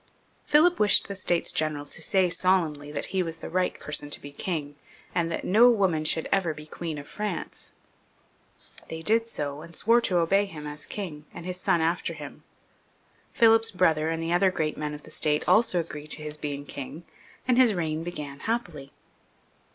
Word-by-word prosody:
Philip 335 Hz, +4 st, +5 dB
wished 205 Hz, -2 st, +4 dB
the 200 Hz, -, -4 dB
States 175 Hz, -3 st, 0 dB
General 155 Hz, -2 st, -1 dB
to 155 Hz, -, -8 dB
say 185 Hz, +2 st, +2 dB
solemnly 160 Hz, -6 st, +1 dB
that 145 Hz, -, -2 dB
he 190 Hz, -, +2 dB
was 165 Hz, -2 st, -3 dB
the -, -, -8 dB
right 185 Hz, +1 st, 0 dB
person 150 Hz, -1 st, -3 dB
to -, -, -3 dB
be 145 Hz, -, -10 dB
king, 145 Hz, -1 st, -4 dB, 0.4 s
and 170 Hz, -1 st, 0 dB
that -, -, -3 dB
no 230 Hz, +6 st, +6 dB
woman 190 Hz, -9 st, +2 dB
should 160 Hz, +1 st, 0 dB
ever 180 Hz, -5 st, +1 dB
be 150 Hz, 0 st, -10 dB
Queen 160 Hz, 0 st, -5 dB
of 145 Hz, 0 st, -8 dB
France. 210 Hz, -4 st, -5 dB, 1.2 s
They 160 Hz, 0 st, -6 dB
did 225 Hz, +4 st, +2 dB
so, 145 Hz, -8 st, -4 dB
and 170 Hz, 0 st, -12 dB
swore 230 Hz, +6 st, +4 dB
to 185 Hz, -6 st, +1 dB
obey 195 Hz, +4 st, +3 dB
him 155 Hz, -6 st, -9 dB
as 150 Hz, 0 st, -7 dB
king, 155 Hz, -8 st, -6 dB
and 170 Hz, -, -8 dB
his 180 Hz, 0 st, -4 dB
son 170 Hz, -, +2 dB
after 170 Hz, +1 st, 0 dB
him. 145 Hz, -2 st, -9 dB, 0.9 s
Philip's 225 Hz, 0 st, +5 dB
brother 160 Hz, -5 st, +2 dB
and 165 Hz, 0 st, -2 dB
the 165 Hz, +1 st, 0 dB
other 190 Hz, +2 st, +4 dB
great 155 Hz, -4 st, -1 dB
men 150 Hz, -1 st, -4 dB
of 150 Hz, -, -11 dB
the 155 Hz, -, -14 dB
State 150 Hz, -1 st, +1 dB
also 220 Hz, -5 st, +4 dB
agreed 155 Hz, -2 st, -6 dB
to 155 Hz, -, -9 dB
his 150 Hz, 0 st, -5 dB
being 145 Hz, -1 st, -5 dB
king, 140 Hz, +4 st, -7 dB, 0.4 s
and 250 Hz, -1 st, +4 dB
his 240 Hz, -5 st, +5 dB
reign 160 Hz, -2 st, -2 dB
began 150 Hz, -5 st, -6 dB
happily. 175 Hz, -12 st, -3 dB
165 Hz, 190 wpm, -27 LUFS, 150-190 Hz, 1.2 s, no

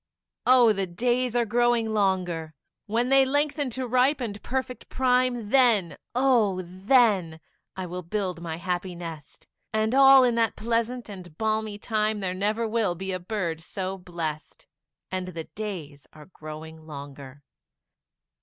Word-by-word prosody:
Oh, 245 Hz, -3 st, +6 dB
the 195 Hz, -2 st, -2 dB
days 245 Hz, +6 st, 0 dB
are 240 Hz, -1 st, +2 dB
growing 235 Hz, 0 st, +1 dB
longer; 180 Hz, -6 st, 0 dB, 0.3 s
When 235 Hz, +4 st, 0 dB
they 270 Hz, 0 st, +6 dB
lengthen 290 Hz, +1 st, 0 dB
to 260 Hz, -, -2 dB
ripe 255 Hz, +4 st, +3 dB
and 210 Hz, -5 st, -5 dB
perfect 260 Hz, 0 st, -4 dB
prime, 250 Hz, -4 st, +1 dB
Then, 235 Hz, -10 st, +4 dB, 0.2 s
oh, 235 Hz, -8 st, +3 dB
then, 190 Hz, -3 st, +2 dB, 0.4 s
I 185 Hz, -, -4 dB
will 180 Hz, +1 st, -5 dB
build 180 Hz, -1 st, -3 dB
my 165 Hz, -1 st, -4 dB
happy 180 Hz, +1 st, -3 dB
nest; 165 Hz, -4 st, -9 dB, 0.3 s
And 220 Hz, +1 st, 0 dB
all 270 Hz, 0 st, +8 dB
in 245 Hz, -1 st, +3 dB
that 230 Hz, -1 st, +1 dB
pleasant 235 Hz, +2 st, -1 dB
and 180 Hz, -6 st, -10 dB
balmy 220 Hz, -1 st, -1 dB
time, 215 Hz, 0 st, -1 dB
There 185 Hz, -2 st, -2 dB
never 210 Hz, +4 st, 0 dB
will 215 Hz, -5 st, 0 dB
be 190 Hz, +2 st, -4 dB
a 185 Hz, -, -2 dB
bird 175 Hz, -4 st, -3 dB
so 190 Hz, +2 st, -4 dB
blest; 170 Hz, -4 st, -6 dB, 0.5 s
And 185 Hz, -1 st, -3 dB
the 165 Hz, -3 st, -6 dB
days 160 Hz, -10 st, -7 dB
are 150 Hz, -1 st, -13 dB
growing 160 Hz, -1 st, -10 dB
longer. 140 Hz, -1 st, -10 dB
205 Hz, 145 wpm, -26 LUFS, 175-240 Hz, 0.5 s, all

